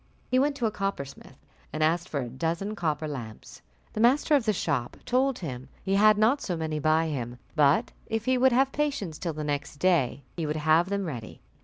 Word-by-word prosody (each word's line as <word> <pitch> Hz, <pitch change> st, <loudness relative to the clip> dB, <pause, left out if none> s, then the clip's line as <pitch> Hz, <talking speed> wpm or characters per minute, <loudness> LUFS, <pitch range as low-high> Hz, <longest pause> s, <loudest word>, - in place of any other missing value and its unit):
He 255 Hz, -, +4 dB
went 285 Hz, +1 st, +2 dB
to 245 Hz, -, -2 dB
a 220 Hz, -, +1 dB
coppersmith, 170 Hz, -10 st, -5 dB, 0.3 s
and 155 Hz, -, -1 dB
asked 170 Hz, +3 st, +1 dB
for 140 Hz, -, -2 dB
a 125 Hz, -, -4 dB
dozen 165 Hz, -, -2 dB
copper 155 Hz, -4 st, -1 dB
lamps: 120 Hz, -7 st, -8 dB, 0.3 s
the -, -, -4 dB
master 270 Hz, +6 st, +4 dB
of 275 Hz, -6 st, +4 dB
the 215 Hz, -, +3 dB
shop 145 Hz, -, -2 dB
told 260 Hz, +1 st, +1 dB
him 130 Hz, -6 st, -6 dB
he 195 Hz, -, -1 dB
had 210 Hz, +1 st, +6 dB
not 230 Hz, +7 st, +3 dB
so 175 Hz, -3 st, -2 dB
many 155 Hz, -1 st, -2 dB
by 155 Hz, +2 st, +3 dB
him, 125 Hz, -6 st, -4 dB, 0.2 s
but 145 Hz, -1 st, +3 dB, 0.2 s
if 225 Hz, 0 st, -2 dB
he 260 Hz, -, +3 dB
would 260 Hz, +1 st, +4 dB
have 265 Hz, +2 st, +3 dB
patience 280 Hz, -, -2 dB
till 170 Hz, -3 st, -3 dB
the 150 Hz, 0 st, -5 dB
next 145 Hz, 0 st, -3 dB
day, 145 Hz, -5 st, +1 dB
he 165 Hz, -3 st, -2 dB
would 150 Hz, -, -1 dB
have 155 Hz, +3 st, +3 dB
them 200 Hz, -1 st, -1 dB
ready. 120 Hz, -9 st, -7 dB
165 Hz, 210 wpm, -27 LUFS, 150-215 Hz, 0.3 s, had